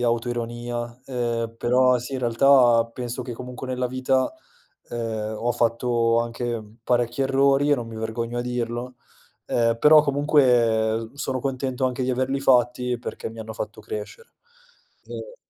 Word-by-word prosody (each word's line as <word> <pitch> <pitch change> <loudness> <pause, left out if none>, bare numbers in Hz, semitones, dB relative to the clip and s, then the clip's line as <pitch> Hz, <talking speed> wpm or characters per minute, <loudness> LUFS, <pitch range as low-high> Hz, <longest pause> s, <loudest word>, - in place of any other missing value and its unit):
autoironia, 120 0 -2
ehm, 115 -3 -2
però 125 +1 +3
sì, 125 +3 -8
in 130 - -2
realtà 120 -1 +4
penso 125 0 -4
che 120 - -6
comunque 125 +2 -7
nella 125 -1 -2
vita, 130 - 0 0.6
ehm, 110 -2 -3
ho 120 +3 -1
fatto 115 0 +1
anche 120 -1 -3 0.2
parecchi 120 +1 +1
errori 135 +1 +3
e - - +6
non 120 -3 -5
mi 110 - -8
vergogno 115 +2 -3
a - - -1
dirlo, 125 0 -3 0.5
ehm, 115 -1 +1
però 150 0 +8
comunque 120 -6 +2
sono 135 -2 -3
contento 130 -1 -2
anche 130 0 -1
di 130 - 0
averli 130 +2 0
fatti 125 -1 +2
perché 120 - -6
mi 115 0 -9
hanno 110 0 -7
fatto 110 0 -6
crescere. 105 - -7 0.8
Ehm - - -8
120 Hz, 145 wpm, -24 LUFS, 115-130 Hz, 0.8 s, però